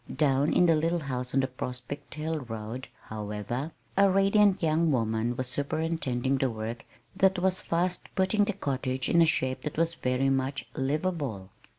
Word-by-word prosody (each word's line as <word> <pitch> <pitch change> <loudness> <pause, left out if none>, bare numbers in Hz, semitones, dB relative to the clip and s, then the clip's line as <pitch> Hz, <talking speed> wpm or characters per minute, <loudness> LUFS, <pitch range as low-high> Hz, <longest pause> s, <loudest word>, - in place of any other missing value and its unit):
Down 140 -1 +3
in 180 - +4
the 165 - +5
little 165 +2 +1
house 125 -3 -3
on 135 - +5
the 130 - 0
Prospect 130 +3 -6
Hill 155 +1 -2
road, 115 0 -6 0.2
however, 105 +7 -4 0.2
a 200 0 +5
radiant 195 0 +4
young 160 0 +3
woman 115 -1 0
was 130 - -1
superintending 140 -2 -1
the 135 - +2
work 115 +1 -5 0.3
that 190 0 +3
was 185 +1 +1
fast 180 +2 -1
putting 195 +2 +3
the 210 - -1
cottage 130 -6 -2
into 170 0 +6
a - - 0
shape 130 -4 0
that 150 - -5
was 165 +1 +2
very 130 -2 +1
much 135 +1 -1
"livable." 135 - -2
140 Hz, 170 wpm, -28 LUFS, 125-165 Hz, 0.3 s, into